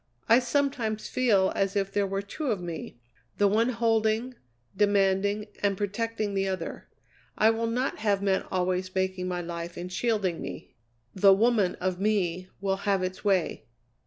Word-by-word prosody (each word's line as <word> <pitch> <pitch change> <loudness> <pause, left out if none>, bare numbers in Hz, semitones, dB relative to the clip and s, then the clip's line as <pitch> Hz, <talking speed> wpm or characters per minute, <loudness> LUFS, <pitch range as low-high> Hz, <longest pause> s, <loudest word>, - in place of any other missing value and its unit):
I 230 +2 +7
sometimes 245 -4 -1
feel 210 -7 +3
as 195 +1 0
if 195 -1 0
there 200 0 +1
were 195 +1 -2
two 285 +9 -5
of 215 -6 0
me, 170 -7 -6 0.4
the 205 - +4
one 220 +4 +2
holding, 225 0 +1 0.4
demanding, 205 0 +2 0.2
and 200 -1 +1
protecting 210 +1 -2
the 195 0 0
other. 190 -1 -4 0.5
I 220 +1 +5
will 230 0 -1
not 250 +4 -1
have 205 -2 +1
men 195 -1 +1
always 185 0 -1
making 190 -1 -1
my 180 -1 -2
life 170 0 -6
and 180 +1 -6
shielding 200 -5 0
me; - - -8 0.4
the 195 0 +6
woman 215 -3 +2
of 185 -1 -2
me 185 -4 0
will 195 0 0
have 195 -1 0
its 185 0 -4
way. 190 -9 0
200 Hz, 160 wpm, -27 LUFS, 185-220 Hz, 0.5 s, I